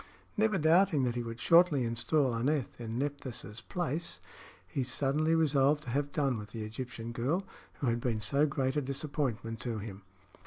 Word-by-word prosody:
Never 215 -2 +2
doubting 165 -1 +4
that 120 -2 +1
he 120 - -2
would 115 0 -6
shortly 165 -5 +5
install 120 +4 +1
Aneth 130 +1 -1
in 115 0 -4
Nephthys' 130 -6 -4
place, 170 -2 -3 0.5
he 135 - -3
suddenly 145 +5 +1
resolved 150 -2 +3
to 125 - -5
have 145 +2 0
done 135 -6 0
with 105 0 -8
the 110 0 -5
Egyptian 115 +1 -6
girl, 140 +11 -1 0.3
who - - -5
had 120 -1 +1
been 115 -3 0
so 140 +8 +2
great 135 -1 -1
a 150 - +2
disappointment 130 -5 -2
to 115 +2 -3
him. 100 -2 -7
135 Hz, 170 wpm, -31 LUFS, 115-150 Hz, 0.5 s, shortly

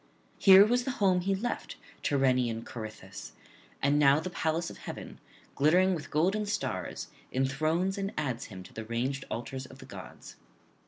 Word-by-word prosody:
Here 195 0 +9
was 245 +3 +2
the 265 - -3
home 185 -3 +3
he 195 +2 +1
left, 235 +6 -3 0.3
Tyrrhenian 125 -5 +1
Corythus; 110 -4 -8 0.5
now 140 0 +5
the 175 +3 -5
palace 165 0 -1
of - - -11
heaven, - - -8 0.3
glittering 180 +6 +4
with 160 -4 -5
golden 190 +7 +1
stars, 210 +1 -3 0.2
enthrones 155 +9 0
and 195 0 -2
adds 130 -6 -2
him 95 -3 -9
to - - -15
the 110 - -6
ranged 125 +4 -2
altars 130 +3 -5
of - - -14
the - - -12
gods.' - - -11
150 Hz, 155 wpm, -30 LUFS, 130-190 Hz, 0.5 s, Here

